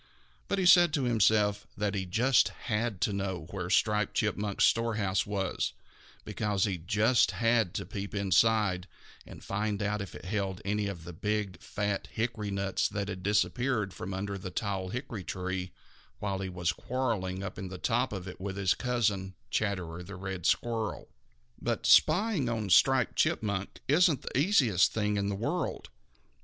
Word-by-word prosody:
But 200 Hz, -, 0 dB
he 190 Hz, -, +1 dB
said 175 Hz, -2 st, +7 dB
to 140 Hz, -, 0 dB
himself 105 Hz, -3 st, +2 dB
that 100 Hz, 0 st, 0 dB
he 95 Hz, -2 st, -2 dB
just 120 Hz, +7 st, +4 dB
had 105 Hz, -3 st, -3 dB
to 105 Hz, -, +1 dB
know 95 Hz, -4 st, -3 dB
where 90 Hz, -3 st, -4 dB
Striped 105 Hz, +1 st, +2 dB
Chipmunk's 105 Hz, -1 st, +1 dB
storehouse 105 Hz, -5 st, +1 dB
was, 100 Hz, -2 st, -1 dB, 0.5 s
because 105 Hz, -3 st, -1 dB
he 95 Hz, -4 st, 0 dB
just 105 Hz, +8 st, +3 dB
had 115 Hz, -5 st, +2 dB
to -, -, -3 dB
peep 100 Hz, +1 st, -6 dB
inside 100 Hz, -1 st, +2 dB, 0.4 s
and -, -, -11 dB
find 105 Hz, 0 st, -2 dB
out 105 Hz, 0 st, -1 dB
if 100 Hz, -, -7 dB
it -, -, -10 dB
held 95 Hz, -1 st, -2 dB
any 105 Hz, +1 st, 0 dB
of 95 Hz, -5 st, -6 dB
the 90 Hz, +1 st, -8 dB
big, 105 Hz, 0 st, -2 dB
fat 105 Hz, -1 st, -2 dB
hickory 110 Hz, -2 st, -2 dB
nuts 100 Hz, -1 st, 0 dB
that 100 Hz, -1 st, -3 dB
had 95 Hz, -2 st, -5 dB
disappeared 105 Hz, +1 st, 0 dB
from 90 Hz, +3 st, -6 dB
under 100 Hz, +1 st, -3 dB
the 90 Hz, -, -6 dB
tall 95 Hz, -1 st, -3 dB
hickory 120 Hz, -4 st, -5 dB
tree 95 Hz, 0 st, -4 dB, 0.5 s
while 100 Hz, -2 st, -2 dB
he 95 Hz, -1 st, -3 dB
was 90 Hz, -1 st, -1 dB
quarreling 105 Hz, -8 st, -2 dB
up 95 Hz, -, -6 dB
in 95 Hz, -, -5 dB
the 95 Hz, 0 st, -7 dB
top 120 Hz, +6 st, 0 dB
of 95 Hz, -2 st, -5 dB
it 90 Hz, -, -9 dB
with 95 Hz, 0 st, -4 dB
his 95 Hz, -2 st, +3 dB
cousin, 105 Hz, -6 st, -1 dB, 0.2 s
Chatterer 90 Hz, -5 st, -2 dB
the 95 Hz, +2 st, -9 dB
Red 95 Hz, -2 st, -4 dB
Squirrel. 115 Hz, -3 st, -1 dB, 0.5 s
But -, -, -2 dB
spying 190 Hz, -, +4 dB
on 110 Hz, -5 st, -2 dB
Striped 130 Hz, +7 st, +4 dB
Chipmunk 100 Hz, -3 st, 0 dB
isn't 155 Hz, 0 st, +4 dB
the -, -, -7 dB
easiest 135 Hz, -, +4 dB
thing 105 Hz, -1 st, 0 dB
in 100 Hz, 0 st, 0 dB
the 100 Hz, -, -1 dB
world. 145 Hz, -, -3 dB
100 Hz, 170 wpm, -30 LUFS, 95-115 Hz, 0.5 s, said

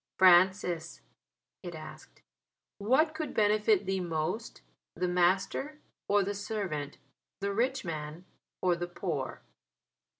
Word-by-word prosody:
"Francis," 180 Hz, -1 st, +4 dB, 0.6 s
it 175 Hz, -3 st, -7 dB
asked, 155 Hz, 0 st, -11 dB, 0.6 s
"what 265 Hz, +10 st, +3 dB
could 310 Hz, -4 st, -4 dB
benefit 210 Hz, -1 st, +3 dB
thee 190 Hz, 0 st, 0 dB
most, 175 Hz, +5 st, -3 dB, 0.3 s
the 180 Hz, +1 st, 0 dB
master 190 Hz, +12 st, +1 dB, 0.3 s
or 205 Hz, 0 st, +4 dB
the 200 Hz, +2 st, -2 dB
servant, 195 Hz, -9 st, -4 dB, 0.4 s
the 200 Hz, 0 st, -1 dB
rich 260 Hz, +4 st, 0 dB
man 155 Hz, +1 st, -5 dB, 0.4 s
or 180 Hz, -1 st, +4 dB
the 175 Hz, +1 st, -4 dB
poor?" 170 Hz, -7 st, -4 dB
185 Hz, 110 wpm, -30 LUFS, 175-210 Hz, 0.6 s, Francis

